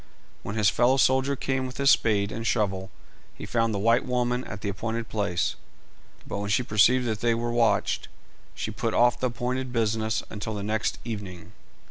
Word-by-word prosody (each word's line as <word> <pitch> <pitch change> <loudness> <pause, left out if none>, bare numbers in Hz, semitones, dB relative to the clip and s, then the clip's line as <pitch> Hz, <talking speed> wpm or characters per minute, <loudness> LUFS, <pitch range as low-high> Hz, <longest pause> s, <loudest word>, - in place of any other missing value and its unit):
When 105 - -5
his 105 -2 +3
fellow 125 +3 +3
soldier 130 +1 +3
came 130 0 -2
with 125 - -9
his 140 0 +5
spade 100 -2 +2
and 115 0 -4
shovel 95 -4 0 0.5
he - - -8
found 115 -1 0
the 105 - -1
white 115 +5 +3
woman 125 0 0
at 100 0 -7
the 100 - -2
appointed 115 +3 -4
place, 100 -5 0 0.7
but - - -4
when 100 0 -3
she 105 +4 +2
perceived 120 +4 +4
they 115 +1 0
were 120 +1 -2
watched 120 -1 +1 0.5
she - - -4
put - - -2
off 120 0 +4
the 130 - +1
appointed 125 +1 -3
business 110 -3 0
until 105 +1 -5
the 100 - -4
next 110 +1 -1
evening. 100 -7 -7
115 Hz, 180 wpm, -26 LUFS, 105-125 Hz, 0.7 s, his